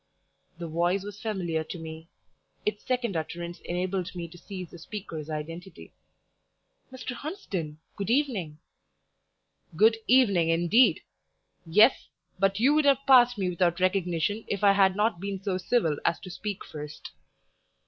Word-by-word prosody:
The 170 -1 -5
voice 175 +4 0
was 205 0 -9
familiar 175 -7 -2
to 175 - -7
me 160 0 -9 0.6
its 210 0 -2
second 245 -6 -1
utterance 170 +2 -4
enabled 180 +1 -3
me 170 -1 -5
to 175 - -13
seize 185 -3 -8
the 175 - -11
speaker's 165 -5 -7
identity. 165 +4 -7 1.0
"Mr. 255 -1 -6
Hunsden! 205 - -5 0.2
good 200 +1 -4
evening." 230 - 0 1.2
"Good 220 +5 +5
evening, 200 -10 +4
indeed! 175 +9 +4 0.7
yes, 210 +10 +5 0.3
but 195 +1 +2
you 265 +6 +4
would 305 -1 +3
have 275 -1 +3
passed 245 -3 +6
me 185 -2 0
without 175 0 +1
recognition 185 +2 0
if 200 0 -3
I 200 - +7
had 195 -1 +4
not 210 -3 +1
been 200 -1 -4
so 190 -2 -1
civil 180 -7 +1
as - - +1
to 185 - -9
speak 200 +2 -5
first." 150 -1 -9
190 Hz, 145 wpm, -27 LUFS, 170-215 Hz, 1.2 s, I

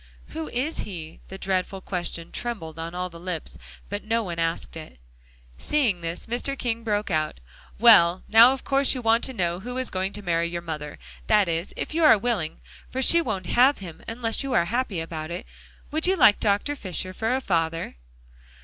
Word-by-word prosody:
"Who 160 -1 -5
is 275 - -1
he?" 165 -5 -6
The 190 - -8
dreadful 190 0 -2
question 175 -3 -4
trembled 165 -10 -5
on 165 +1 -5
all 180 0 -2
the 170 - -11
lips; 175 -2 -5 0.3
but 205 +1 -5
no 230 +1 0
one 170 -4 -5
asked 165 0 -2
it. 155 - -10 0.6
Seeing 240 -12 +1
this, 165 +1 -4
Mr. 250 +4 -2
King 230 -2 -2
broke 210 -2 -1
out, 155 - -1 0.4
"Well, 185 -6 +6
now 230 +3 +8
of 270 - -4
course 275 0 +2
you 250 - -5
want 225 +1 +3
to 265 - -5
know 175 -5 -1
who 245 +5 -6
is 260 -1 0
going 190 +1 -1
to 210 - -6
marry 170 -2 +1
your 170 0 -5
mother, 150 -3 -6 0.3
that 210 -3 +4
is, 165 +2 -2
if - - -4
you 330 +1 +1
are 300 -8 +8
willing. 200 -8 -2 0.3
For 260 +1 -1
she 335 +6 +6
won't 200 - -3
have 255 +9 +4
him 175 -5 -9
unless 230 -1 -1
you 275 -2 -3
are 170 - +4
to - - -7
be - - -6
happy 235 -7 -1
about 160 -1 -6
it. 175 +4 -5 0.5
Would 315 +3 +1
you 380 - +3
like 235 - +6
Dr. 205 +7 +1
Fisher 185 -5 -3
for 225 +5 0
a - - 0
father?" 165 - -1
195 Hz, 205 wpm, -25 LUFS, 170-240 Hz, 0.6 s, now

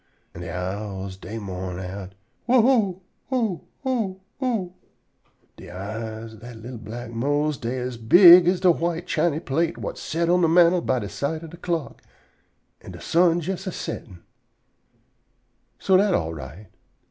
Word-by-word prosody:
an' 85 - -9
de 85 - -6
owls 95 +1 -4
dey 110 +4 -8
mourn 95 -3 -5
out, 95 +1 -7 0.3
"You 255 - +5
you 205 -8 +2 0.3
o 225 -9 0 0.2
o 215 -8 -1 0.2
o!" 220 -9 -1 0.8
De - - -12
eyes 110 +4 -6
ob 110 - -13
dat 120 0 -10
li'l 115 +2 -9
black 115 +2 -8
Mose 145 +5 0
dey 120 +2 -3
as 125 -1 -4
big 175 - +8
as 180 0 +2
de 185 -2 +6
white 170 +1 -2
chiny 165 -3 0
plate 165 +3 -1
whut - - -5
set 170 +1 -1
on 180 +1 +3
de 165 - +4
mantel 170 +1 +5
by 125 -8 -1
side 155 - -4
de 160 - -11
clock, 170 -3 -4 0.8
an' - - -10
de - - -10
sun 170 0 +3
jes 190 +3 -4
a - - -1
settin'! 95 - -7 1.5
So 190 -1 +3
dat 200 0 +3
all 80 0 -1
right. 80 +7 -10
145 Hz, 160 wpm, -24 LUFS, 105-175 Hz, 1.5 s, big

